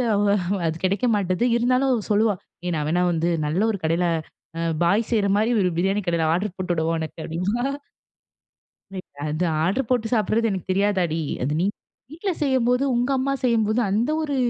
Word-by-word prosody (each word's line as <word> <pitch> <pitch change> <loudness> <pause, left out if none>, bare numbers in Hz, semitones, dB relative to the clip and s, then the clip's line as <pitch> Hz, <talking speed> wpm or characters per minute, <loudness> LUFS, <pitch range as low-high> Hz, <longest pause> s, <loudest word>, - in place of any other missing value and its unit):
அவ 205 - +2 0.4
அது 160 - 0
கிடைக்க 200 +6 +1
மாட்டுது. 185 +2 0
இருந்தாலும், 255 +3 +2
அவ 225 -4 -1
சொல்லுவா! 210 0 +3 0.3
ஏய்! 175 - -1
நான் 150 -1 -1
வேணா 175 +2 +2
வந்து 165 0 0 0.2
நல்ல 155 +6 0
ஒரு 200 - -4
கடையில 165 +2 +1 0.5
அ - - -1 0.2
பாய் 200 +6 +2
செய்றமாரி 210 0 +2
ஒரு 180 - +2
பிரியாணி 195 +3 +1
கடைல 170 -2 +1
ஆர்ட்ரு 185 +2 -1
போட்டுவிடவா! 170 -3 -1
உனக்கு 160 +1 -6
அப்பிடினுவா! 195 +10 -2 1.3
லைக் 185 - -8 0.2
அது 155 +4 -1 0.2
ஆர்ட்ரு 195 +11 +1
போட்டு 245 -3 +1
சாப்பிடுறது 225 +1 +1
எனக்கு 190 -1 -4
தெரியாதாடி! 185 -4 +1 0.2
அது 135 +4 0
நீ 185 - +2 0.5
வீட்ல 365 +5 -3
செய்யும்போதும், 260 -1 +2
உங்க 245 +3 0
அம்மா 275 +1 0
செய்யும்போதும் 225 -2 +2
அந்த 225 +8 +1
ஒரு 290 -3 -2
200 Hz, 165 wpm, -23 LUFS, 175-235 Hz, 1.3 s, சொல்லுவா